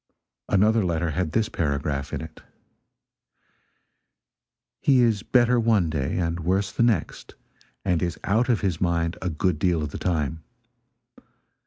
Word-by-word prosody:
Another 110 +3 +3
letter 85 -2 -1
had 85 0 -2
this 110 -1 +1
paragraph 70 -2 -2
in - - -3
it: 80 -1 -10 2.4
"He 135 -2 +3
is 115 -4 +2
better 125 -1 +3
one 110 -8 +2
day 70 -1 -2
and 85 -1 -1
worse 95 +4 0
the - - -2
next, 115 -7 0 0.5
and 90 -4 +1
is 85 -3 -2
out 115 +5 +1
of 115 -4 +2
his 95 -6 -1
mind 85 -1 0
a 95 - -1
good 85 0 -1
deal 85 -2 +1
of 75 - -5
the - - -6
time. 80 -3 -1
90 Hz, 145 wpm, -24 LUFS, 80-105 Hz, 2.4 s, Another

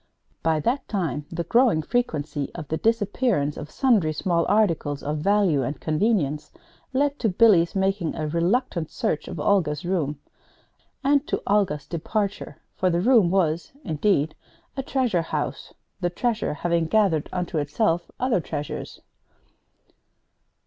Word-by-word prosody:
By 160 -1 +1
that 260 - -1
time 155 - -2
the 170 0 -3
growing 230 -3 +3
frequency 155 - -2
of 160 -4 -6
the 160 - -1
disappearance 210 - +1
of 150 - -7
sundry 215 - +2
small 170 +1 0
articles 165 -9 +1
of 150 +1 -2
value 195 -4 +2
and 135 +3 -3
convenience 155 -3 0 0.4
led 285 +2 0
to 225 - +1
Billy's 185 -4 +4
making 190 -3 0
a 155 - -3
reluctant 170 - 0
search 150 - -2
of 170 - -6
Olga's 155 -3 +1
room 155 -6 -1 0.8
and 280 +1 +2
to - - -2
Olga's 190 -8 +1
departure; 200 +5 -3 0.2
for 185 - +1
the 170 -1 +1
room 220 -2 +4
was, 170 -1 0
indeed, 160 - +1 0.4
a 270 - -2
treasure 255 -9 0
house, 165 - -4 0.3
the 175 -2 0
Treasure 220 -2 -1
having 170 +1 0
gathered 185 -6 +2
unto 180 -3 -2
itself 165 +4 0
other 250 -8 +1
treasures. 150 -2 -6
175 Hz, 135 wpm, -24 LUFS, 155-215 Hz, 0.8 s, Billy's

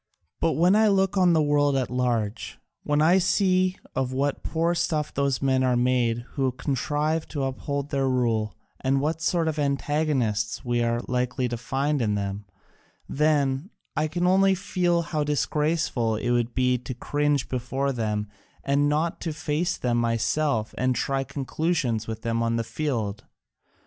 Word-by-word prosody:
But 165 - +2
when 180 +4 +4
I 220 0 +5
look 195 -1 +2
on 180 -3 +4
the 160 -2 +3
world 145 -1 +2
at 130 -3 -1
large, 120 -4 -1 0.2
when 150 +1 +1
I 175 +4 +5
see 185 0 +2 0.2
of 130 -1 -1
what 140 +2 -1
poor 165 +1 0
stuff 155 -3 -1
those 140 -2 0
men 130 -1 +2
are 125 -1 +2
made 120 -1 +1
who 135 -3 0
contrive 150 +4 -1
to 145 -3 -3
uphold 140 +2 -3
their 135 -1 +1
rule 115 -4 0 0.2
and 135 +1 +1
what 155 +3 -1
sort 165 0 +1
of 155 -1 -1
antagonists 140 -8 0
we 120 -1 +1
are 120 0 0
likely 125 +1 -1
to 120 - -2
find 135 +4 -1
in 105 -3 +1
them, 100 0 -3 0.6
then 145 +1 +1 0.3
I 155 - +1
can 175 +3 -1
only 190 +1 +4
feel 180 -3 0
how 155 -2 -1
disgraceful 150 -5 0
it 120 +3 -1
would 120 -1 0
be 125 -1 +2
to 125 +1 -6
cringe 145 +1 0
before 130 +2 -2
them 105 -4 -2 0.4
and 140 +1 +2
not 155 +3 -1
to 165 - -3
face 160 +3 -1
them 120 -1 0
myself 115 +1 0
and 130 0 +1
try 135 +2 0
conclusions 135 -4 -1
with 110 0 -5
them 115 0 0
on 115 0 +1
the 115 - 0
field. 115 -5 -3
135 Hz, 165 wpm, -25 LUFS, 120-155 Hz, 0.6 s, I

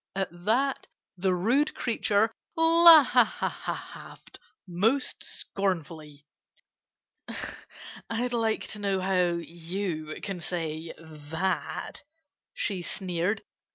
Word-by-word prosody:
At 195 0 -1
that 225 +11 0 0.3
the 185 0 +1
rude 245 +12 +2
creature 220 -2 +1 0.2
laughed 325 -7 +4 0.3
most 215 +10 0
scornfully. 160 -6 -4 1.8
"I'd 240 +2 -1
like 225 -2 0
to 210 - -7
know 200 -2 0
how 185 -2 +2
you 165 -2 -4
can 195 -3 -4
say 165 -2 -4
that," 160 +3 -4 0.5
she 200 - -2
sneered. 180 +2 -2
190 Hz, 85 wpm, -28 LUFS, 170-225 Hz, 1.8 s, laughed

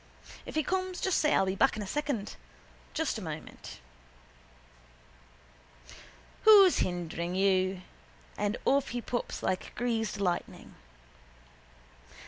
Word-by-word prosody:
If - - -7
he 310 - +2
comes 370 +2 -2
just 380 - +1
say 300 - +3
I'll 195 - +3
be 190 - -1
back 245 +4 +2
in 210 - -3
a - - -6
second. 270 -2 -3 0.6
Just - - -1
a - - -8
moment. - - -8 2.6
Who's 405 -4 +7
hindering 175 0 -2
you? 185 -1 +1 0.5
And 205 +2 -1
off 280 0 +3
he 245 0 -4
pops 240 +1 -4
like 185 - -2
greased 225 -4 -1
lightning. 180 -3 -3
220 Hz, 115 wpm, -30 LUFS, 190-295 Hz, 2.6 s, Who's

